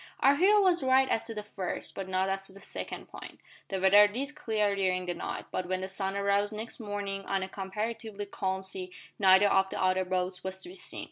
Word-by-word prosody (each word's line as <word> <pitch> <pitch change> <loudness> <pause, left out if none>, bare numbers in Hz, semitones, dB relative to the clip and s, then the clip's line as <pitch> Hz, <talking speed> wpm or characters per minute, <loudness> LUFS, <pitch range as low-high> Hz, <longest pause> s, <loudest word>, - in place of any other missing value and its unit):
Our 275 +1 +5
hero 410 +5 +5
was 360 -4 +3
right 265 0 +4
as 225 - 0
to 225 - -6
the 210 - -4
first, 195 -3 -5
but 195 -1 -5
not 185 0 +1
as 195 0 -2
to 190 - -12
the 195 - -12
second, - - -6
point. - - -11 0.3
The 195 - -2
weather 200 +2 +7
did 270 +8 -4
clear 210 -6 0
during 185 -2 0
the 175 - -2
night, 170 - -5
but 185 - -2
when 185 0 -1
the 190 - -3
sun 195 0 -3
arose 200 +1 +1
next 220 +4 -6
morning 205 -2 -4
on 195 -1 0
a - - -4
comparatively 210 +2 -4
calm 190 -1 -2
sea 185 -1 -6 0.3
neither 190 0 +7
of 190 -1 +3
the - - -5
other 185 0 +2
boats 180 0 -2
was 190 0 -4
to - - -8
be - - -10
seen. 365 -1 -4
195 Hz, 230 wpm, -30 LUFS, 190-215 Hz, 0.3 s, weather